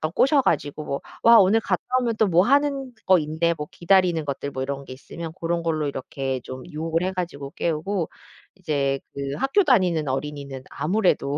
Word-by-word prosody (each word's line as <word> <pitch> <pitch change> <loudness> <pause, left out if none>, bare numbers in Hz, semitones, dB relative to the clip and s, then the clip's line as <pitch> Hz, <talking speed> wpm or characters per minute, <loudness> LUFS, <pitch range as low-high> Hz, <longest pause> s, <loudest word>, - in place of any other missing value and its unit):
꼬셔 275 +1 +4
가지고 145 - -1 0.2
"와 230 0 +8
오늘 200 +3 +5
갔다 185 -4 -1 0.2
오면 235 -3 -1
또 220 - +3
뭐 175 -1 +4
하는 275 -1 +2 0.2
거 185 -2 +6
있네." 160 +2 0
뭐 150 0 -5
기다리는 175 -2 +2
것들 140 0 -3
뭐 130 -1 -3
이런 140 0 -4
게 130 - -8
있으면 160 +5 -8
고런 170 0 -2
걸로 155 -3 0
이렇게 135 -1 -3
좀 130 0 -8
유혹을 165 +1 -2
해 185 - 0
가지고 165 -7 -5
깨우고 170 +2 -2 0.5
이제 140 -7 -1
그 140 0 -4
학교 275 - +3
다니는 185 - +2
어린이는 140 0 -4
아무래도 155 -3 +1
165 Hz, 355 characters per minute, -24 LUFS, 140-190 Hz, 0.5 s, 와